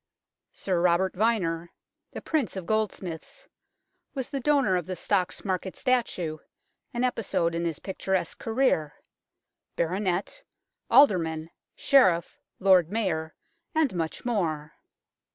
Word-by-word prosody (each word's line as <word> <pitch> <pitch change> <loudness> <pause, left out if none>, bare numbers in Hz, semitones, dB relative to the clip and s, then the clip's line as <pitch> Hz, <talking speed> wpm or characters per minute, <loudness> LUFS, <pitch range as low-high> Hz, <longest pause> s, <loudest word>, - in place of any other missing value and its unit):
Sir 180 -3 -1
Robert 180 +1 +2
Vyner, 180 -6 0 0.2
" - - -55
the - - -7
Prince 285 - -1
of 190 -3 -5
Goldsmiths," 195 -5 -3 0.7
was 265 -2 -4
the 275 - -2
donor 275 -8 +3
of 175 -3 -2
the 185 - -3
Stocks 185 +2 -1
Market 190 -1 -2
statue, 205 - 0 0.5
an 240 -1 -2
episode 205 -9 0
in 170 +1 -1
his 165 -3 -2
picturesque 190 -2 -2
career 225 - +1 0.8
Baronet, 180 +2 -1 0.5
Alderman, 165 - +4 0.2
Sheriff, 185 - +3 0.2
Lord 185 -3 +4
Mayor, 170 -8 -1 0.4
and 310 -8 +2
much 165 +3 -3
more. 165 -10 -1
185 Hz, 115 wpm, -27 LUFS, 170-225 Hz, 0.8 s, Alderman